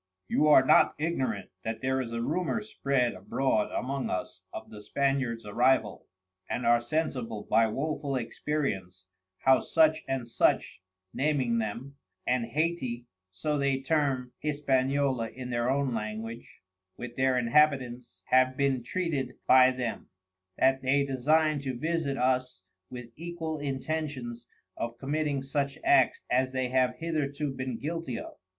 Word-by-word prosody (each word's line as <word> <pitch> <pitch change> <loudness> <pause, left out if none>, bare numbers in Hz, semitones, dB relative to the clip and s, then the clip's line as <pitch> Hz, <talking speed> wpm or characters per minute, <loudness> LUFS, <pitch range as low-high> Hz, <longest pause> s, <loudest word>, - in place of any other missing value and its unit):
You 150 - +2
are 140 -3 +7
not - - +5
ignorant 130 - -2
that 110 +2 -4
there 130 0 0
is 120 -2 -5
a 115 0 -2
rumor 180 - -1
spread 135 - 0
abroad 105 +4 0
among 135 +1 -2
us 90 - -4
of - - -8
the 105 - -9
Spaniards 130 -1 -1
Arrival, 115 0 +1 0.4
and 125 - -2
are 120 0 +5
sensible 120 -6 -2
by 115 +2 +3
woeful 140 +3 -2
experience 115 -7 -3 0.4
how 130 -1 +5
such 160 -1 +3
and 135 -3 -2
such 115 - +1 0.3
(naming 130 -5 +1
them) 120 +6 -5 0.3
and 125 -2 +1
Hayti 135 -4 -1 0.3
(so 145 +11 -2
they 140 -1 +1
term 135 -3 0
Hispaniola 135 -4 0
in 125 +2 -7
their 120 +1 0
own 135 -1 +1
language) 110 +1 -6 0.3
with 120 -1 -7
their 130 -1 +2
Inhabitants 125 -1 +1
have 130 0 +4
been 135 -2 +1
treated 145 -3 -2
by 130 0 +7
them, 125 -3 -4 0.5
that 135 0 +3
they 140 +2 +2
design 150 +3 +2
to 130 -3 -4
visit 155 -1 -1
us 125 -5 0 0.3
with 125 -2 -9
equal 165 -1 -5
intentions 135 -4 -4 0.3
of 115 0 -4
committing 145 0 -1
such 140 0 -2
acts - - +4
as 130 +1 +2
they 130 -1 -1
have 130 0 +2
hitherto 150 -3 -2
been 130 -2 -4
guilty 160 -4 -4
of. - - -7
130 Hz, 140 wpm, -29 LUFS, 120-145 Hz, 0.5 s, are